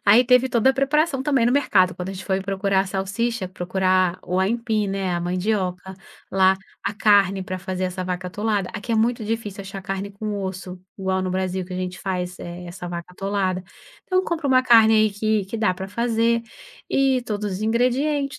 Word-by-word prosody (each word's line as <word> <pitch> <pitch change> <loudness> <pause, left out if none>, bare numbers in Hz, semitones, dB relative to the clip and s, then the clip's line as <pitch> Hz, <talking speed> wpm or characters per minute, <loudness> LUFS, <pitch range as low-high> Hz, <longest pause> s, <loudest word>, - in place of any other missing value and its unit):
Aí 220 +5 +6
teve 250 +1 +4
toda 245 +2 +4
a - - -1
preparação 275 +1 +1
também 270 -5 +2
no 245 - +3
mercado 190 -10 +3
quando 180 +1 -5
a - - -5
gente 190 0 -8
foi 190 -1 0
procurar 195 0 +1
a 195 - -1
salsicha, 195 +2 -2
procurar 185 0 +1
o 180 +1 -1
aipim, 220 +1 0
né, 195 -2 -1
a 175 - -1
mandioca, 185 0 -2 0.4
lá 190 0 +4 0.3
a - - -1
carne 200 -2 +4
pra 185 0 -5
fazer 185 0 -3
essa 185 0 -3
vaca 180 0 -3
atolada, 205 -1 -1
aqui 230 +1 -4
é - - +3
muito 225 0 +1
difícil 210 -2 -3
achar 195 0 -7
carne 195 +1 -4
com 205 0 -4
osso, 185 -1 -6 0.2
igual 190 0 0
no 185 - -2
Brasil 185 0 -1
que 185 - -10
a - - -3
gente 185 0 -4
faz, 180 -2 -3
eh, 175 +1 -8
essa 175 0 -7
vaca 170 -1 -5
atolada. 190 -1 -1 0.4
Então 370 0 +1
compra 330 -5 -2
uma 260 -1 +4
carne 225 -3 +6
aí 215 -1 +4
que 215 0 0
que 215 +4 -5
dá 215 -4 +2
pra 190 +1 -7
fazer, 230 +1 +1 0.5
e 265 -2 +2
todos 210 -3 -3
os 185 +3 -4
ingredientes 265 +6 +1
195 Hz, 200 wpm, -23 LUFS, 185-230 Hz, 0.5 s, Aí